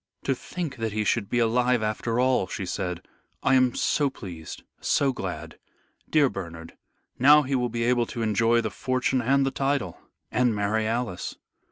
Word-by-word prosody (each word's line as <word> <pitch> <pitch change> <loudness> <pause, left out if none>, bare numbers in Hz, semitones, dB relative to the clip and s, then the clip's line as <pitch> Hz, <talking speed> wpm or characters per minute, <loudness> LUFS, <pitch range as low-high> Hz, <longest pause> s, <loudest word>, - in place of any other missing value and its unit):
"To 135 - +1
think 155 +3 -5
that 115 -2 -2
he 110 0 0
should 105 -1 0
be 120 - 0
alive 120 0 +2
after 115 +2 -1
all," 130 -6 +2
she 95 - -4
said. 90 -1 -3 0.4
"I 135 - +3
am 130 -2 +4
so 145 -2 +1
pleased, 85 -10 -9 0.2
so 135 -1 +2
glad. 85 -7 -6 0.5
Dear 150 -3 +4
Bernard, 85 -7 -7 0.5
now 150 +4 +7
he 135 +1 -3
will 125 -2 +1
be 115 0 -2
able 120 -1 +2
to 115 - -4
enjoy 115 +2 +3
the 110 - -3
fortune 130 +4 0
and 135 +3 +3
the 135 - 0
title, 135 - -1 0.3
and 125 -3 +2
marry 105 +2 0
Alice." 115 -5 -3
120 Hz, 175 wpm, -26 LUFS, 105-130 Hz, 0.5 s, now